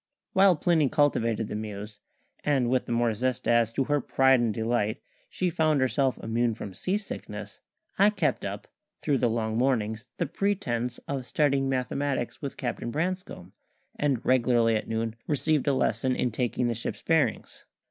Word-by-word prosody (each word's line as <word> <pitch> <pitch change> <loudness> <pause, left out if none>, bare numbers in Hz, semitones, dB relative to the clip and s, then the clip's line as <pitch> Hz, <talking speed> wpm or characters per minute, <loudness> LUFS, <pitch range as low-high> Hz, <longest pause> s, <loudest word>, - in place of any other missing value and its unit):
While 190 -1 +6
Plinny 160 -2 +2
cultivated 115 -7 +1
the - - -6
Muse 105 0 -6 0.4
and 135 -5 +2
with 130 -1 +1
the - - -4
more 120 -1 +2
zest 125 +3 -2
as, 115 -1 +3
to 135 - +1
her 145 +2 +1
pride 130 +1 +4
and 120 -2 +1
delight, 110 +1 -1 0.3
she 180 -1 -1
found 155 -2 +2
herself 130 +1 +1
immune 115 0 0
from 100 -3 -7
sea 185 - -1
sickness 210 - -8 0.4
I 200 +2 +7
kept 170 -10 0
up, - - -5 0.3
through 140 -3 0
the 120 - +2
long 110 0 -1
mornings, 115 -3 0
the 170 - 0
pretence 150 - -1
of 135 -3 -3
studying 140 -3 +1
mathematics 130 0 -2
with 140 - -5
Captain 120 -2 -3
Branscome, 160 - -4 0.4
and 140 -5 0
regularly 120 -3 +3
at 110 - -2
noon 115 0 -2
received 150 0 +1
a 140 - +4
lesson 130 +1 +1
in 125 - 0
taking 120 +1 -1
the 120 - 0
ship's 115 - -5
bearings. 160 -4 0
125 Hz, 170 wpm, -27 LUFS, 115-145 Hz, 0.4 s, I